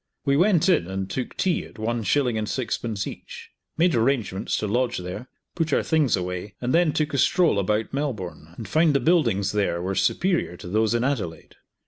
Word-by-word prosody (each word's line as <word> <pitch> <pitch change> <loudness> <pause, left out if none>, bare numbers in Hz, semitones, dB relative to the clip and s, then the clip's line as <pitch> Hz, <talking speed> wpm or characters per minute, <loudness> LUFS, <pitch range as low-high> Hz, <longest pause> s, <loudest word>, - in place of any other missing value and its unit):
We 140 -1 +3
went 175 +1 +3
in 170 - +3
and 95 0 -3
took 125 +5 -5
tea 185 -3 +1
at - - -14
one 115 +2 -2
shilling 125 +1 +1
and 110 -1 -2
sixpence 115 -4 -2
each, - - -9 0.3
made 170 +1 +3
arrangements 115 -5 0
to - - -2
lodge 120 +3 0
there, 90 +7 -6 0.3
put 165 -3 -1
our - - +2
things 155 -6 +2
away, 90 +2 -5
and 125 +1 -1
then 170 -2 +4
took 155 0 -1
a 140 - +1
stroll 170 - +3
about 105 +5 -1
Melbourne 95 - -4
and 110 - -7
found 155 - +3
the - - +4
buildings 120 - +2
there 100 -5 0
were 95 +2 -2
superior 95 - 0
to - - -10
those 110 +4 +1
in 120 - +1
Adelaide. 115 -12 -3
115 Hz, 195 wpm, -24 LUFS, 95-145 Hz, 0.3 s, then